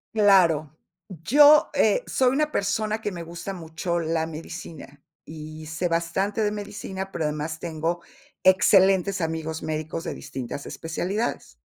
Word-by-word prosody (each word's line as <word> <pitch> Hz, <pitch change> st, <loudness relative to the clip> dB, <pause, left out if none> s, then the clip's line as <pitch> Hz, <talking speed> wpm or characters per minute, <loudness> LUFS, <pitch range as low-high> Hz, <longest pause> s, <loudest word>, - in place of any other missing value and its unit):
Claro, 170 Hz, -8 st, +4 dB, 0.3 s
yo, 285 Hz, -, +5 dB
eh, -, -, +3 dB
soy 255 Hz, -1 st, +2 dB
una 300 Hz, +1 st, +1 dB
persona 215 Hz, +2 st, -1 dB
que 210 Hz, -3 st, -4 dB
me 170 Hz, -1 st, -6 dB
gusta 170 Hz, +4 st, -7 dB
mucho 170 Hz, 0 st, -3 dB
la 160 Hz, 0 st, 0 dB
medicina, 155 Hz, -2 st, -9 dB, 0.2 s
y 155 Hz, 0 st, -9 dB
sé 160 Hz, +3 st, -2 dB
bastante 175 Hz, +6 st, -1 dB
de 210 Hz, -1 st, +1 dB
medicina, 200 Hz, -2 st, -6 dB
pero 165 Hz, -, -2 dB
además 150 Hz, +2 st, -3 dB
tengo 170 Hz, +1 st, -3 dB, 0.4 s
excelentes 190 Hz, 0 st, +4 dB
amigos 160 Hz, 0 st, -3 dB
médicos 155 Hz, +1 st, -4 dB
de -, -, -4 dB
distintas 130 Hz, +2 st, -7 dB
especialidades. 180 Hz, -, -3 dB
170 Hz, 135 wpm, -25 LUFS, 160-200 Hz, 0.4 s, yo